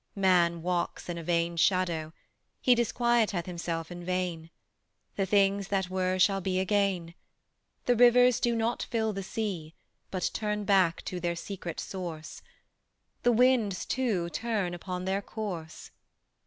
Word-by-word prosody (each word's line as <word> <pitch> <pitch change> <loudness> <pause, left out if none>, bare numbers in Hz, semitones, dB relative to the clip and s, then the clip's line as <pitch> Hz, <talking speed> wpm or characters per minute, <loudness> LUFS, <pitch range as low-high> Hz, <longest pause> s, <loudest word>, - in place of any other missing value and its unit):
Man 175 -4 +3
walks 180 0 -2
in 170 -1 -3
a - - -7
vain 170 0 0
shadow; 170 -3 +1 0.5
he 250 - +5
Disquieteth 235 -5 +1
himself 170 -2 -4
in 175 0 -7
vain. 175 -2 -2 0.7
The 195 -1 0
things 195 0 +2
that 190 -2 -1
were 185 0 0
shall 195 +1 +3
be 185 0 0
again. 190 -3 0 0.7
The 245 - +3
rivers 245 +1 +6
do 235 -1 +1
not 230 +1 0
fill 220 -2 0
the 195 - -4
sea, 190 -6 -4 0.3
But 185 -2 -1
turn 210 -1 -2
back 190 -5 +2
to 180 - -4
their 170 0 -1
secret 175 -1 -6
source; 170 -5 -6 0.8
The 245 - +4
winds 235 -5 +3
too 205 -10 -1
turn 210 -6 -1
upon 180 +1 -5
their 190 +1 0
course. 190 -7 -6
190 Hz, 140 wpm, -29 LUFS, 175-215 Hz, 0.8 s, rivers